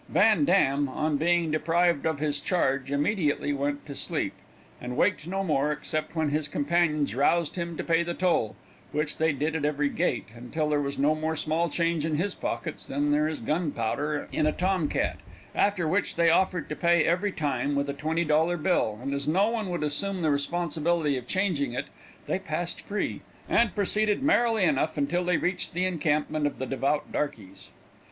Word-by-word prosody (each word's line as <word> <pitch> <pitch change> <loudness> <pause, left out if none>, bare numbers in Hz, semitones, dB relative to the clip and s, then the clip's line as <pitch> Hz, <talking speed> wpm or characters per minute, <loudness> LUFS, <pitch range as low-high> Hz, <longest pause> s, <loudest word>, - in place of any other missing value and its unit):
Van 205 -7 +4
Dam, 145 -6 +3
on 150 +3 -1
being 170 +1 +2
deprived 165 0 +2
of 160 -2 0
his 145 -1 -1
charge, 135 -6 0
immediately 145 -1 +1
went 145 +1 -2
to 145 - -7
sleep, - - -2 0.5
and 125 +1 -5
waked 185 -4 +1
no 195 +2 -1
more, 150 -4 +1
except 155 +2 -3
when 160 -2 +1
his 150 +1 0
companions 150 -1 +1
roused 150 +5 +2
him 170 -2 -4
to - - -3
pay 165 0 +2
the 170 0 -3
toll, 170 - +1 0.4
which 150 0 -1
they 160 0 +3
did 150 +3 -2
at 155 - -2
every 145 -1 +1
gate, 160 -7 -1
until 150 +6 -3
there 150 -1 +2
was 140 0 -3
no 145 +3 +3
more 155 +1 -2
small 160 +2 0
change 165 -1 0
in 160 -1 0
his 185 +6 -1
pockets 115 - -4
than 145 +2 0
there 150 +1 +3
is 155 -4 -4
gunpowder 150 0 -1
in 155 - +1
a - - +3
tom 180 -3 0
cat, - - -1 0.4
after 200 -5 +1
which 190 +6 0
they 170 -1 +4
offered 180 -2 +1
to 150 - -4
pay 170 -1 +3
every 185 +4 +1
time 145 -4 -1
with 140 0 0
a 140 - -2
twenty 160 +4 -1
dollar 160 +3 +2
bill, 150 - +1
and 140 +1 -2
as 140 0 -3
no 195 +8 +3
one 220 -4 -2
would 175 -3 -2
assume 180 +5 -1
the 155 - +3
responsibility 160 0 0
of 125 -1 -5
changing 170 -10 0
it, 125 - -2 0.4
they 185 - -1
passed 175 -1 -3
free, 205 +1 -2 0.3
and 235 -4 +2
proceeded 210 +3 +1
merrily 235 - +3
enough 160 -2 +1
until 165 +5 0
they 180 -1 +2
reached 180 0 -1
the 180 +1 +1
encampment 155 -3 0
of 145 - -5
the 130 - -3
devout 135 +3 -1
darkeys. 100 -10 -4
155 Hz, 190 wpm, -27 LUFS, 145-175 Hz, 0.5 s, Van